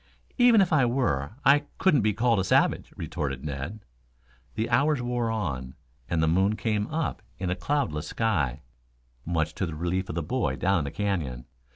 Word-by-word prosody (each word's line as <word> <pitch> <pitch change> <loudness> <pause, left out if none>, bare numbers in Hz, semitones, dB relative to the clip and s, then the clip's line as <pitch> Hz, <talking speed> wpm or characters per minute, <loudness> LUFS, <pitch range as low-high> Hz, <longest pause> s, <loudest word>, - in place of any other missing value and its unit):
"Even 245 -4 +7
if 175 -3 +2
I 145 -4 +5
were, 120 - 0
I 145 +2 +5
couldn't 155 -9 +4
be 110 0 +2
called 115 0 +2
a - - +1
savage," 95 - +2
retorted 70 -1 -4
Ned. 75 +9 -5 0.7
The 110 +1 -1
hours 145 +4 +3
wore 120 -1 -1
on, 70 - -3 0.3
and 80 -2 +1
the - - +3
moon 95 +6 +2
came 105 -2 -1
up 160 -1 -2 0.2
in 90 -1 -2
a - - 0
cloudless 85 - -1
sky, 75 - -1 0.6
much 80 -2 -1
to 95 - -2
the 80 - -5
relief 90 +4 -2
of - - -4
the 85 - -1
boy 125 +11 -1
down 95 0 +2
in - - -1
the - - -3
canyon. 80 -11 -2
95 Hz, 185 wpm, -27 LUFS, 80-120 Hz, 0.7 s, Even